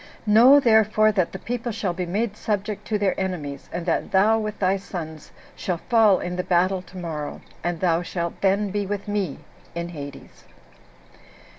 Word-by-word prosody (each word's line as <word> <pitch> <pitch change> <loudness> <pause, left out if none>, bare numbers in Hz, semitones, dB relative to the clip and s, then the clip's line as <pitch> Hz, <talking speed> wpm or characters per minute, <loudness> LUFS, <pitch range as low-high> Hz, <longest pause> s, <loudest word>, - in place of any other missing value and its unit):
Know, 235 +7 +7
therefore, 215 -3 +4
that 185 -5 0
the - - -6
people 240 +2 -4
shall 195 -4 -2
be 180 0 -4
made 210 +4 -1
subject 210 -1 -3
to 215 - 0
their 200 -2 +1
enemies, 155 -8 -4
and 175 - -4
that 170 - 0
thou, 215 +4 +4
with 215 -1 -4
thy 190 0 +2
sons, 160 -5 -7 0.3
shall 180 -2 -2
fall 220 -1 +4
in 180 0 -4
the 180 - -1
battle 185 +1 +2
tomorrow, 165 -5 -6 0.2
and 175 -1 -2
thou 170 -2 +2
shalt 170 -1 -4
then 200 +1 +2
be 205 0 -2
with 205 0 -4
me 200 -8 -2 0.4
[in 170 0 -3
Hades]." 145 -4 -10
190 Hz, 170 wpm, -24 LUFS, 175-210 Hz, 0.4 s, Know